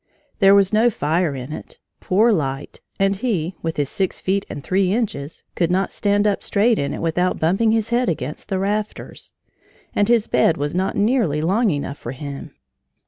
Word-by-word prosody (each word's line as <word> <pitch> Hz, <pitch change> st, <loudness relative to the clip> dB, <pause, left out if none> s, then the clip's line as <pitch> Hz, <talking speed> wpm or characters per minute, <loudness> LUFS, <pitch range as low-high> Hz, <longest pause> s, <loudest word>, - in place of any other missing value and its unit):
There 195 Hz, -1 st, +7 dB
was 200 Hz, 0 st, +3 dB
no 225 Hz, +3 st, +5 dB
fire 160 Hz, -4 st, 0 dB
in 130 Hz, +3 st, -6 dB
it, -, -, -9 dB, 0.2 s
poor 215 Hz, +6 st, +3 dB
light, 140 Hz, -7 st, -2 dB, 0.2 s
and 195 Hz, 0 st, +2 dB
he, 190 Hz, -7 st, -1 dB
with 165 Hz, -1 st, -3 dB
his 145 Hz, -2 st, 0 dB
six 190 Hz, -2 st, -2 dB
feet 195 Hz, +1 st, -1 dB
and 140 Hz, -, -7 dB
three 185 Hz, 0 st, +1 dB
inches, 195 Hz, -10 st, -3 dB
could 170 Hz, -2 st, 0 dB
not 190 Hz, +2 st, 0 dB
stand 205 Hz, 0 st, +1 dB
up 205 Hz, -2 st, +1 dB
straight 220 Hz, +3 st, +2 dB
in 140 Hz, -, -1 dB
it -, -, -5 dB
without 180 Hz, +2 st, 0 dB
bumping 195 Hz, +8 st, +2 dB
his 225 Hz, 0 st, 0 dB
head 245 Hz, +1 st, +2 dB
against 150 Hz, 0 st, -4 dB
the 190 Hz, -, 0 dB
rafters. 205 Hz, +2 st, -3 dB, 0.6 s
And 205 Hz, -, +2 dB
his 235 Hz, -2 st, +3 dB
bed 165 Hz, -, +3 dB
was 145 Hz, +1 st, -2 dB
not 185 Hz, +2 st, -1 dB
nearly 205 Hz, -, +2 dB
long 200 Hz, +9 st, +2 dB
enough 145 Hz, -3 st, -3 dB
for 120 Hz, -, -6 dB
him. 140 Hz, +1 st, -8 dB
190 Hz, 190 wpm, -21 LUFS, 155-210 Hz, 0.6 s, There